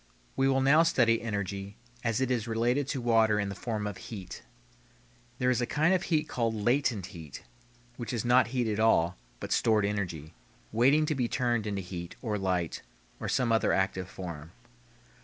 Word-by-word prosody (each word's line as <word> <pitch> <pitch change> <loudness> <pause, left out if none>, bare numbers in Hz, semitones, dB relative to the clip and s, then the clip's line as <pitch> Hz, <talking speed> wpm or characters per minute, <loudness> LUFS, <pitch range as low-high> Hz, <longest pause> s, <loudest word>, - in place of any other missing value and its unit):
We 135 0 +2
will 135 0 +2
now 140 +4 +6
study 120 -9 +3
energy 100 -2 -4 0.3
as 115 -1 0
it 130 -1 0
is 120 -2 0
related 120 +5 +1
to 140 - -2
water 115 -3 +3
in 100 -1 -1
the - - -4
form 105 +1 -3
of 105 -2 -4
heat. 100 -5 -8 1.0
There 125 0 +2
is 125 -1 +1
a 120 - 0
kind 155 +7 +2
of 185 - +2
heat 160 -4 0
called 115 -2 -1
"latent 120 -2 +1
heat," 80 -6 -9 0.5
which 120 -3 -5
is 120 -2 -2
not 125 +1 +5
heat 120 -1 -1
at 105 -1 -1
all, 90 -6 +3 0.2
but - - -6
stored 110 -2 +3
energy, 90 -7 -3 0.4
waiting 135 +7 +4
to 155 - 0
be 125 -4 0
turned 120 -3 0
into 100 -2 -3
heat, 85 -1 -7
or 105 -3 -1
light, 90 -3 -1 0.4
or - - -4
some 125 -3 +1
other 115 - +3
active 95 -1 0
form. 85 -3 -8
115 Hz, 185 wpm, -29 LUFS, 100-125 Hz, 1.0 s, now